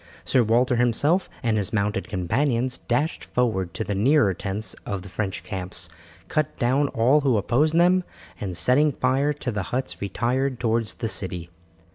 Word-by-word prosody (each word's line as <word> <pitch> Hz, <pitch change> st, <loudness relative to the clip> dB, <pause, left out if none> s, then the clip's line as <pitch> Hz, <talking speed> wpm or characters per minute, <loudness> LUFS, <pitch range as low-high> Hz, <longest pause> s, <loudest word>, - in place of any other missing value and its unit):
Sir 130 Hz, -, +3 dB
Walter 120 Hz, +3 st, +2 dB
himself 145 Hz, +10 st, +2 dB
and 115 Hz, -2 st, +1 dB
his 100 Hz, -3 st, -1 dB
mounted 105 Hz, 0 st, -1 dB
companions 120 Hz, +6 st, 0 dB
dashed 130 Hz, +7 st, -1 dB
forward 95 Hz, -8 st, -1 dB
to -, -, -2 dB
the 105 Hz, -, -3 dB
nearer 110 Hz, +1 st, +3 dB
tents 100 Hz, +4 st, -3 dB
of 100 Hz, -3 st, -4 dB
the 100 Hz, -, -10 dB
French 100 Hz, 0 st, -3 dB
camps, 95 Hz, -3 st, -2 dB, 0.4 s
cut 155 Hz, -1 st, -1 dB
down 135 Hz, +4 st, +2 dB
all 130 Hz, +5 st, +3 dB
who 130 Hz, -5 st, +2 dB
opposed 140 Hz, +10 st, +1 dB
them, 180 Hz, +2 st, +4 dB, 0.4 s
and 95 Hz, -4 st, -4 dB
setting 135 Hz, -, +4 dB
fire 135 Hz, +4 st, +1 dB
to 140 Hz, -3 st, -4 dB
the 105 Hz, -2 st, -2 dB
huts 130 Hz, +2 st, -3 dB
retired 125 Hz, +6 st, -1 dB
towards 115 Hz, -1 st, 0 dB
the 115 Hz, -, -3 dB
city. 90 Hz, -4 st, -3 dB
120 Hz, 165 wpm, -24 LUFS, 100-135 Hz, 0.4 s, them